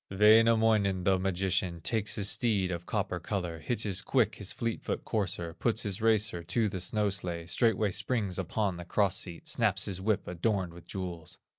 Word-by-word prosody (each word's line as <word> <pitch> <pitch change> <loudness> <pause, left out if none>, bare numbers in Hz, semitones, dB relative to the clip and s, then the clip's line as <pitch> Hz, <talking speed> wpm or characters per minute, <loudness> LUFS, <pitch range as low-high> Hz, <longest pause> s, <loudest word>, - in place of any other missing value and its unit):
Wainamoinen, 110 -2 +4
the 95 0 +3
magician, 95 -2 -1
Takes 105 +5 -1
his 100 -2 +1
steed 100 -2 +2
of 85 0 -5
copper 100 -4 -2
color, 90 -2 -4
Hitches 100 0 0
quick 110 -1 +1
his 100 -2 -3
fleet 115 -1 -3
foot - - -4
courser, 90 -6 -2
Puts 115 +5 0
his 105 -1 -2
racer 110 -5 +2
to 105 +7 0
the 95 -3 -4
snow 105 +2 0
sledge, 85 -3 -3
Straightway 110 -3 +2
springs 100 -1 -1
upon 95 0 -1
the 85 - -8
cross 100 0 +1
seat, 85 -3 -7
Snaps - - +2
his 95 -2 -4
whip 105 0 0
adorned 90 0 -1
with 85 -1 -14
jewels. 90 -4 -6
95 Hz, 175 wpm, -30 LUFS, 90-110 Hz, -, Wainamoinen